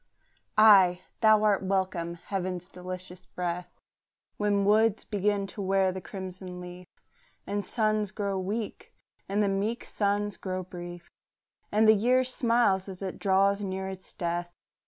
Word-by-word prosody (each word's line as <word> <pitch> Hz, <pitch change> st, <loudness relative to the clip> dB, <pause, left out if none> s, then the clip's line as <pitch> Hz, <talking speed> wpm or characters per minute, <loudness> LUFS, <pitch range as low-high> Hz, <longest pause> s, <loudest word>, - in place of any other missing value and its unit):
Ay, 195 Hz, -5 st, +7 dB, 0.2 s
thou 215 Hz, -1 st, +5 dB
art 210 Hz, -2 st, +3 dB
welcome, 185 Hz, -3 st, -1 dB
heaven's 180 Hz, 0 st, -4 dB
delicious 185 Hz, 0 st, -8 dB
breath, 180 Hz, 0 st, -4 dB, 0.7 s
When 205 Hz, -1 st, +1 dB
woods 215 Hz, +1 st, +3 dB
begin 205 Hz, -1 st, 0 dB
to 205 Hz, -, -6 dB
wear 190 Hz, -1 st, +2 dB
the 190 Hz, 0 st, -6 dB
crimson 185 Hz, -1 st, -7 dB
leaf, 180 Hz, 0 st, -9 dB, 0.6 s
And 205 Hz, 0 st, -2 dB
suns 215 Hz, 0 st, 0 dB
grow 200 Hz, -2 st, -2 dB
meek, 210 Hz, +3 st, -5 dB, 0.3 s
and 205 Hz, +2 st, +2 dB
the -, -, +2 dB
meek 205 Hz, +4 st, -1 dB
suns 205 Hz, 0 st, -1 dB
grow 185 Hz, -1 st, -4 dB
brief, 175 Hz, -1 st, -9 dB, 0.6 s
And 215 Hz, +1 st, +4 dB
the 220 Hz, -, +9 dB
year 245 Hz, +5 st, +3 dB
smiles 235 Hz, -6 st, +1 dB
as 190 Hz, 0 st, -8 dB
it 190 Hz, -, -5 dB
draws 200 Hz, +1 st, +3 dB
near 190 Hz, -1 st, -3 dB
its 190 Hz, 0 st, -9 dB
death. 175 Hz, 0 st, -3 dB
195 Hz, 140 wpm, -28 LUFS, 185-210 Hz, 0.7 s, the